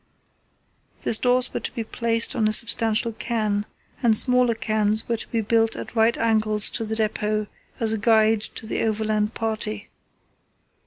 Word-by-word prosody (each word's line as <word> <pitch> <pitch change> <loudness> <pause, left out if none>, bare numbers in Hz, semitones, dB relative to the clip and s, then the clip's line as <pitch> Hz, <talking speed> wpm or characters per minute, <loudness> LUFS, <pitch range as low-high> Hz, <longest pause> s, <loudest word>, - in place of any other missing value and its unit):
The - - -1
stores 250 +3 +4
were - - -2
to - - -5
be 230 - -4
placed 230 +1 0
on 215 - +1
a - - +1
substantial 225 0 +2
cairn, 215 -3 -2 0.3
and 225 -3 +4
smaller 250 -1 +2
cairns 215 -1 +1
were 235 - -1
to - - -7
be 230 - -2
built 225 +1 +1
at - - -8
right 225 +1 +2
angles 215 -2 0
to 225 - -3
the 220 0 -4
depot 215 -1 -1 0.3
as 225 -2 +2
a 220 - -2
guide 220 0 +3
to 220 - -7
the 220 - -3
overland 215 0 -1
party. 215 -1 -4
220 Hz, 165 wpm, -23 LUFS, 215-230 Hz, 0.3 s, stores